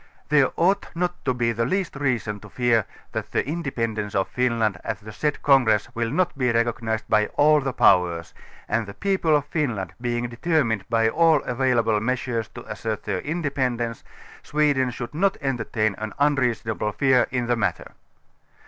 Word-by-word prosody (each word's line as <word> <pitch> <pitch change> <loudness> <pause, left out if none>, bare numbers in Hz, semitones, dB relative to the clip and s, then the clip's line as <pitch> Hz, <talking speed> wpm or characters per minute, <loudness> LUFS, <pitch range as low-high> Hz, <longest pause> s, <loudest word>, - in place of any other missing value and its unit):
There 140 -3 +4
ought 190 +4 +2
not 175 +1 -2
to 130 - +2
be 120 -1 +1
the 115 0 -1
least 185 +7 -1
reason 120 -7 -1
to 105 - -13
fear 115 -2 +2 0.3
that - - -4
the - - -1
independence 115 -10 -3
of 95 -1 +1
Finland 115 -6 0
at 110 -3 -3
the 110 +1 -10
said 150 +7 -2
congress 125 -7 +4
will 115 -1 -1
not 175 +5 0
be 125 -3 +1
recognized 115 -1 -1
by 105 -1 +3
all 150 0 +5
the 135 0 -2
Powers, 85 -6 +3 0.3
and 110 -2 -1
the 100 - -9
people 190 -6 +1
of 145 -1 +1
Finland, 120 - -2
being 120 0 -1
determined 120 - 0
by 115 -1 +3
all 160 +4 +3
available 120 -4 +1
measures 120 -1 -2
to - - -9
assert 110 0 -4
their 100 -3 -2
independence. 130 - -2 0.4
Sweden 145 -4 +1
should 120 -1 -6
not 190 +5 +1
entertain 115 -5 -1
an 110 0 -5
unreasonable 120 -7 0
fear 130 0 +3
in 125 -2 -1
the 120 0 +1
matter. 110 -3 -2
120 Hz, 165 wpm, -24 LUFS, 110-145 Hz, 0.4 s, all